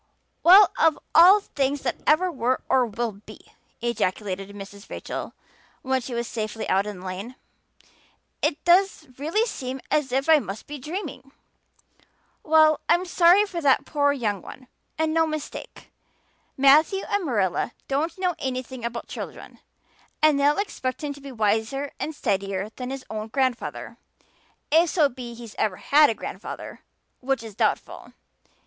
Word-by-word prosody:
"Well, 375 +2 +8
of 320 -2 +4 0.2
all 365 +5 +8
things 280 -5 -2
that 245 - -2
ever 360 +4 +4
were 255 -3 0
or 255 -2 +3
will 230 +1 -3
be!" 200 +1 -14 0.4
ejaculated 195 -4 -2
Mrs. 200 +1 -11
Rachel - - -6 0.5
when 265 0 0
she 245 0 -6
was 235 0 -2
safely 220 -1 -4
out 195 +2 +1
in 200 -3 -7
the - - -11
lane. 195 +7 -6 1.1
"It 295 - -1
does 360 -1 +3
really 335 +10 +1
seem 265 - -5
as 295 -4 +1
if 270 +3 0
I 320 -1 +7
must 200 -4 -7
be 295 0 -8
dreaming. 300 -3 -6 1.1
Well, 310 -1 +4
I'm 345 +2 +3
sorry 355 +3 +5
for 355 -4 -5
that 275 -3 +3
poor 285 -2 +2
young 215 -8 -2
one 255 - -12 0.3
and 315 0 0
no 325 0 +3
mistake. 310 -2 -7 0.7
Matthew 300 +8 +5
and 405 -1 0
Marilla 215 - 0 0.2
don't 310 +5 -1
know 365 -1 0
anything 255 -1 -4
about 235 0 -4
children - - -8 0.6
and 305 -2 +4
they'll 290 +1 +3
expect 305 -9 -3
him 290 -1 -2
to 285 - -14
be 275 0 -9
wiser 225 +5 -1
and 310 - -4
steadier 195 -2 -2
that 250 -1 -5
his 270 -1 -6
own 215 0 -4
grandfather, 255 0 -2 0.7
if 330 +2 +5
so 300 -4 +3
be's 240 -2 -9
he 230 -3 -11
ever 200 -4 0
had 300 +1 +5
a 225 - -1
grandfather, - - -7 0.4
which 265 -2 -1
is 220 -2 -9
doubtful. - - -2
270 Hz, 155 wpm, -24 LUFS, 225-315 Hz, 1.1 s, Well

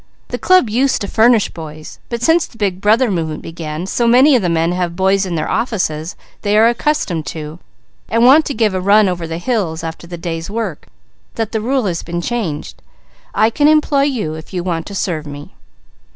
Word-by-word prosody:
The - - -4
club 370 -8 +4
used 255 +5 +1
to 200 - -2
furnish 225 0 +3
boys, 155 -1 -10
but 235 -1 -4
since 325 +4 +3
the 230 - -19
Big 195 -4 -1
Brother 220 +3 +3
movement 160 -4 -3
began, 165 0 -6
so 235 +5 0
many 260 +5 +6
of 245 - +3
the 180 - 0
men 165 0 +1
have 175 -1 -2
boys 190 +1 +2
in 175 - -3
their 155 - -2
offices 180 -8 -2 0.3
they 205 0 +1
are 220 +1 +6
accustomed 235 - -1
to, 155 +1 -7 0.5
and 230 +2 +3
want 295 +5 +6
to 280 - -3
give 215 -4 +1
a 185 - -1
run 205 +2 +5
over 175 -2 -3
the 165 0 -4
hills 175 -5 -2
after 165 +1 -7
the 175 0 -7
day's 165 0 -5
work, 210 -7 -4 0.5
that 225 -2 -2
the 220 - -1
rule 255 +1 0
has 175 -4 -2
been 175 +1 -4
changed. 175 -7 -4 0.5
I 220 +1 +3
can 290 +5 +2
employ 300 -2 +3
you, 230 - -2
if 160 +4 -9
you 175 - -2
want 170 -3 -3
to 200 - -7
serve 160 -6 -2
me." 145 +5 -9
195 Hz, 210 wpm, -17 LUFS, 165-235 Hz, 0.5 s, many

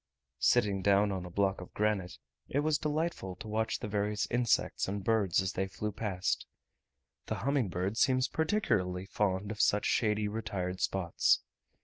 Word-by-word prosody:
Sitting 105 -5 +3
down 100 +1 +4
on 95 -2 -3
a - - -8
block 95 +1 0
of 90 - -12
granite, 100 -4 0 0.3
it 140 - +1
was 155 0 +1
delightful 150 - -2
to 110 - -9
watch 110 +1 0
the - - -5
various 105 0 0
insects 120 -2 +1
and 100 +1 -3
birds 100 -4 +2
as 95 - -2
they 95 +1 -1
flew 105 +2 -4
past. 95 -4 -2 0.8
The - - -1
humming 140 -7 +1
bird 95 +5 -2
seems 130 0 +3
particularly 95 - 0
fond 100 0 -1
of 110 - -2
such 105 - +3
shady 105 -2 +1
retired 95 -4 -3
spots. 90 -3 +2
105 Hz, 160 wpm, -31 LUFS, 95-110 Hz, 0.8 s, down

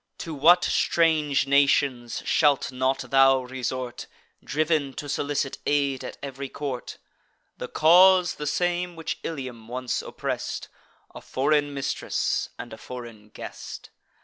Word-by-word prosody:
To 165 - -6
what 165 +5 +5
strange 155 -5 +2
nations 140 -3 +2
shalt 145 -4 +2
not 130 0 -1
thou 135 -1 +5
resort, 125 -1 -5 0.4
Driv'n 150 -3 0
to 145 - -6
solicit 140 -1 -2
aid 140 -2 +1
at - - -7
ev'ry 135 0 -6
court! 135 -4 -5 0.6
The - - -4
cause 180 +3 +5
the 150 - -5
same 175 +2 -1
which 165 -1 -4
Ilium 130 -7 -6
once 125 +1 -3
oppress'd; - - -4 0.4
A - - -9
foreign 145 +2 +1
mistress, 140 -1 -2
and - - -8
a - - -10
foreign 115 -4 -9
guest. - - -9
140 Hz, 125 wpm, -25 LUFS, 130-155 Hz, 0.6 s, what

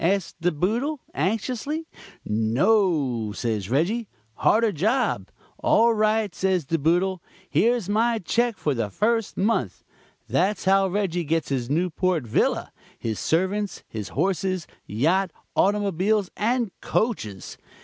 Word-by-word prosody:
asks 190 +1 +1
De 175 +1 +2
Boodle, 230 - -1
anxiously. 250 - -2 0.4
'No,' 125 - +2
says 110 -4 -2
Reggie. 195 - +1 0.3
'Harder 225 0 +3
job.' 205 - 0 0.3
'All 230 +1 +4
right,' 215 -2 +1
says 185 -4 0
De 165 +4 0
Boodle, 175 +4 +1 0.3
'here's 235 -4 +2
my 225 +3 +2
cheque 230 +3 0
for 150 -5 0
the 115 -4 -2
first 225 - 0
month.' 195 - 0 0.4
That's 185 - 0
how 195 0 +4
Reggie 185 -3 -1
gets 165 +1 -1
his 130 -3 -2
Newport 175 0 0
villa, 110 - 0 0.3
his 110 -2 -3
servants, 190 +5 0
his 110 -3 -6
horses, 185 +2 -1 0.2
yacht, 170 - +1 0.3
automobiles 200 0 +1
and 235 0 0
coaches. 110 - -2
190 Hz, 120 wpm, -24 LUFS, 155-215 Hz, 0.4 s, All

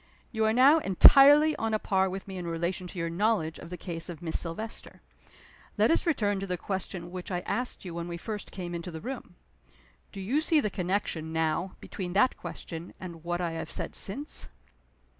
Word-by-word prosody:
You 220 -1 +1
are 220 - +3
now 270 +7 +6
entirely 290 - +7
on 225 -1 0
a - - +3
par 190 -2 +1
with 190 +1 -6
me 190 -1 -6
in 175 -1 -5
relation 170 +2 -2
to 180 - -10
your 170 -1 -1
knowledge 185 -3 0
of - - -10
the 180 - -6
case 165 -1 -5
of 170 - -7
Miss 170 -2 0
Silvester. 195 +7 -6 0.8
Let - - +4
us 335 - +1
return 205 -11 +1
to 195 - -4
the 180 -1 -2
question 180 -1 -5
which 180 -1 -6
I 180 -2 -2
asked 245 +1 -3
you 175 - -6
when 170 0 -4
we 170 -1 -5
first 210 +3 -6
came 175 -2 -6
into 170 +1 -5
the 160 -2 -7
room. 255 +9 -7 0.8
Do 200 - -8
you 240 +11 0
see 315 0 +4
the 210 -8 -1
connection, 180 -4 -2
now, 160 +3 -1
between 180 -3 -6
that 210 +6 +3
question, 165 0 -8
and 170 -3 -9
what 175 +1 -2
I 170 -2 -1
have 165 - -5
said - - -4
since?" 200 - 0
185 Hz, 205 wpm, -29 LUFS, 170-215 Hz, 0.8 s, entirely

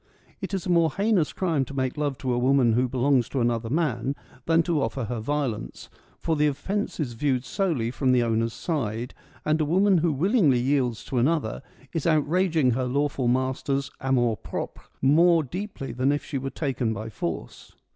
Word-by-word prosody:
It - - -4
is 190 - -4
a - - -3
more 170 -2 +4
heinous 200 -6 +1
crime 165 -7 0
to 140 - -9
make 130 -1 -1
love 145 -3 -1
to 130 -2 -2
a - - 0
woman 130 -2 +3
who 125 +2 +2
belongs 130 0 +2
to 135 - -2
another 115 -1 0
man 135 -3 0 0.3
than 165 0 +4
to 165 -3 0
offer 135 -1 -2
her 115 +1 -3
violence; 120 - -3 0.3
for 165 - -1
the 150 0 +3
offence 195 +10 -2
is 130 -6 -2
viewed 130 +1 0
solely 155 - -1
from 130 +1 +1
the 125 -1 +4
owner's 115 0 0
side, 120 -6 -3 0.3
and 155 +1 +2
a - - +2
woman 190 +4 +3
who 165 0 +2
willingly 160 - +3
yields 125 -2 0
to 130 - -1
another 140 -3 0 0.3
is 165 -1 -1
out 155 -3 +3
raging 165 -5 +2
her 130 +2 0
lawful 140 0 0
master's 130 +2 0
amour 125 -4 +1
propre - - -6 0.2
more 165 +4 +5
deeply 180 - -6
than 130 +3 +1
if 145 +1 -2
she 140 - -3
were 135 +1 -3
taken 130 -5 -2
by 110 +2 -5
force. 85 -6 -6
135 Hz, 190 wpm, -25 LUFS, 125-160 Hz, 0.3 s, more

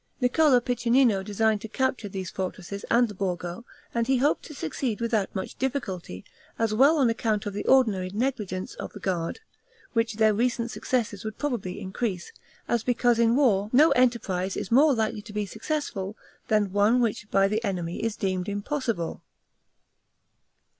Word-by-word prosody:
Niccolo 260 +1 +4
Piccinino 240 -3 +2
designed 210 +1 +1
to - - -6
capture 250 -2 -1
these 190 -2 -5
fortresses 190 +1 -5
and 240 +1 +4
the 210 - -8
Borgo, 180 +1 -4 0.3
and 235 -1 0
he 265 0 +3
hoped 285 +5 +2
to 300 - -10
succeed 220 - -3
without 225 -4 -1
much 190 - -5
difficulty, 195 - -3 0.3
as 225 -2 0
well 275 +8 +5
on 270 -4 +4
account 220 -2 -1
of 205 - -3
the 205 - -3
ordinary 215 -9 +3
negligence 210 -4 -2
of - - -7
the - - -9
guard, 180 - -2 0.5
which 230 -2 0
their 215 0 +4
recent 235 +1 0
successes 220 -6 -2
would 215 -1 -5
probably 240 -11 -3
increase, 190 - -3 0.4
as 235 -2 0
because 245 -1 +2
in 230 0 +4
war 210 -8 +3
no 295 +6 +6
enterprise 205 -7 +1
is 195 - -5
more 280 +3 +5
likely 220 -2 -1
to 210 0 -12
be 210 0 -1
successful 215 - -4 0.3
than 210 -3 +2
one 210 +4 +4
which 215 -3 -1
by 195 0 +4
the 215 +3 -1
enemy 180 -4 -3
is 225 -2 -1
deemed 185 -1 -2
impossible. 205 - -2
220 Hz, 165 wpm, -26 LUFS, 195-245 Hz, 0.5 s, no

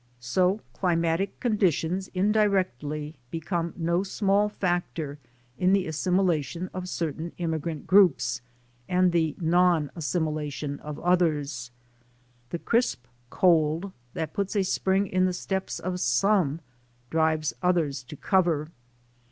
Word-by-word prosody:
So 180 - +1
climatic 170 +1 0
conditions 190 - +1
indirectly 185 - +1 0.2
become 165 +2 -2
no 170 +1 +1
small 200 +1 +1
factor 175 -7 -2 0.4
in 185 +1 +3
the 195 -2 +3
assimilation 175 0 0
of 185 0 -5
certain 165 0 -3
immigrant 160 -2 -3
groups 185 -10 +4 0.5
and 180 0 +3
the 160 -3 +1
non 170 -2 +3
assimilation 150 -3 -2
of 150 -1 -7
others. 150 -8 +1 0.8
The 170 - -3
crisp 170 - 0 0.2
cold 165 +2 +2 0.2
that 160 -1 -3
puts 200 +1 -2
a 200 - +3
spring 190 +1 +1
in 185 -1 +1
the 185 - +1
steps 190 +1 -3
of 180 -1 -3
some 165 - +2 0.5
drives 160 -1 +1
others 165 -7 +1
to 150 - -9
cover. 165 -3 +1
170 Hz, 115 wpm, -27 LUFS, 155-185 Hz, 0.8 s, groups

